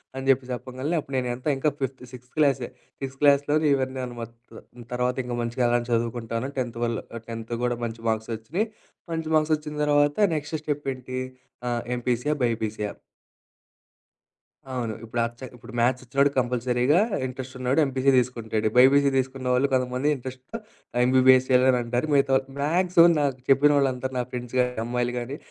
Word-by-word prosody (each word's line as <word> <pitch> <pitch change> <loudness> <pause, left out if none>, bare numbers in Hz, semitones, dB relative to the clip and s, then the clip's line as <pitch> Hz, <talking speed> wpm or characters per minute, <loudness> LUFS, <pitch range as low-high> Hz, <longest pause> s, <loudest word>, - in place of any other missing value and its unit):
అని 135 0 -5
జెప్పి 130 -1 +3
చెప్పగాల్నే 130 +6 -3
అప్పుడు 135 -1 -7
నేనెంత 125 +2 -3
ఇంకా 150 +3 +1
ఫిఫ్త్ 130 -1 -3
సిక్స్త్ 125 0 -13
క్లాసే. 135 -5 +2 0.3
సిక్స్త్ 135 0 -6
క్లాస్‌లోని 145 +2 +4
ఇవన్నీ 130 -1 -2
అన్నీ 120 -1 -9
మొత్తం. 115 +1 -11 0.3
తర్వాతింక 125 0 -1
మంచిగా 120 +1 -1
అలా 120 0 +3
చదువుకుంటాను. 115 +2 -1
టెన్త్ 120 -2 -3
వల్ల్ 115 -2 -1 0.2
అ - - -19
టెన్త్ 115 +1 -6
కూడా 120 -1 0
మంచి 115 0 -6
మార్క్స్ 110 +1 -2
ఒచ్చినయి. 170 - -2 0.5
మంచి 160 -1 -3
మార్క్స్ 155 0 +3
ఒచ్చిన 150 0 -8
తర్వాత 145 0 +3 0.2
నెక్స్ట్ 155 +1 -3
స్టెప్ 145 -2 -3
ఏంటి? 130 0 -6 0.5
ఆహ్, 120 -1 -1
ఎంపీసీయా? 125 +4 0
బైపీసీయా? 110 -3 -1 1.8
అవును. 120 -4 -2
ఇప్పుడ 120 +2 -4 0.2
చ - - -20
ఇప్పుడు 120 0 -13
మ్యాథ్స్ 125 +2 +2
ఒచ్చినోడు 140 +3 +2
కంపల్సరీగా, 125 +4 +2 0.3
ఇంట్రెస్ట్ 130 0 -7
ఉన్నోడు 130 +5 +1
ఎంపీసీ 135 0 +2
తీసుకుంటాడు. 115 -3 0
బైపీసీ 140 +2 +6
తీసుకున్న 130 0 -2
వాళ్ళు 130 +3 +3
కొంతమంది 130 +3 +1
ఇంట్రెస్ట్‌తో 130 - -8 0.5
ఎంబీబీఎస్ 130 0 +5
చేయాలి 130 0 +5
అని 125 - +1
అంటారు. 120 +5 -1
మిగతా 140 -1 +3
వాళ్ళు 135 0 -1
మాగ్సీమం 170 +2 +4
నాకు 135 -3 -1
చెప్పిన 140 +2 +6
వాళ్ళందరూ 130 -1 0
నా 125 - +1
ఫ్రెండ్స్ 125 0 -6
గానీ, 125 0 +2
అమ్మాయిలు 120 0 -1
గానీ, 130 +5 -5
130 Hz, 160 wpm, -25 LUFS, 120-140 Hz, 1.8 s, బైపీసీ